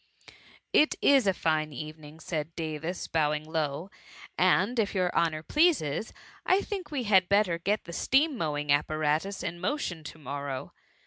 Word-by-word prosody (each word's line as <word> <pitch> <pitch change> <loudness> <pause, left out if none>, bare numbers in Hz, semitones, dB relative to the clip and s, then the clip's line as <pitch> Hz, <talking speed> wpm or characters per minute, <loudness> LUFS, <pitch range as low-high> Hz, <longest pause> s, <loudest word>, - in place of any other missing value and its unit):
" - - -26 0.3
It 305 - +4
is 270 -6 +4
a - - +6
fine 155 -3 0
evening," 155 +2 -9
said 160 -1 -4
Davis, 160 +2 -4
bowing 150 -1 0
low, 160 +2 -3 0.2
*' - - -17
and 190 +6 +3
if 210 -2 0
your 180 -1 0
honour 160 -2 +1
pleases, 275 - +2 0.3
I 375 +2 +3
think 395 -3 -5
we 270 -5 -3
hftd 190 -3 +4
better 200 -4 +3
get 205 +5 0
the 170 - -9
steam 280 - +2
^mowing 150 - -1
apparatus 155 +5 0
in 175 0 -4
QiQtion 185 - -2
to^iQorrow. 140 -3 -6
165 Hz, 155 wpm, -28 LUFS, 155-205 Hz, 0.3 s, a